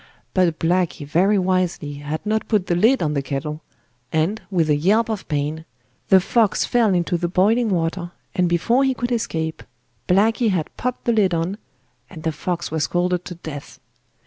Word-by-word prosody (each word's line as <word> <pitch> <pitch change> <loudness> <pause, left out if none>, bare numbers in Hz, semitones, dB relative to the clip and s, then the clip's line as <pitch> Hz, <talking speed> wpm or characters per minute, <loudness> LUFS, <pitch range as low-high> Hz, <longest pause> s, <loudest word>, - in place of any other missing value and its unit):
But 175 -4 +2
Blacky 170 -3 0
very 185 +8 +3
wisely 185 -5 0
had 150 +5 -4
not 215 0 0
put 210 -5 +1
the 175 - 0
lid 225 +7 +3
on 150 -1 0
the 140 - 0
kettle, 145 +3 -4 0.5
and, 165 +8 0
with 175 -5 +1
a 150 - +3
yelp 210 +10 +2
of 215 -4 -4
pain, 150 +2 -2 0.5
the 190 - +7
fox 220 +3 +2
fell 225 -6 +2
into 175 0 0
the 175 - 0
boiling 215 +7 +2
water, 175 -1 -1 0.2
and 180 -1 +1
before 230 +10 +2
he 265 -1 +1
could 240 0 -3
escape, 160 -9 -2 0.5
Blacky 220 +5 +3
had 175 -6 -2
popped 250 0 -3
the 235 - +3
lid 195 -5 +3
on, 175 +6 -2 0.5
and 155 - -10
the 160 - 0
fox 170 +2 -3
was 160 -2 0
scalded 180 0 0
to 180 - -7
death. 155 -4 -9
180 Hz, 180 wpm, -21 LUFS, 160-210 Hz, 0.5 s, the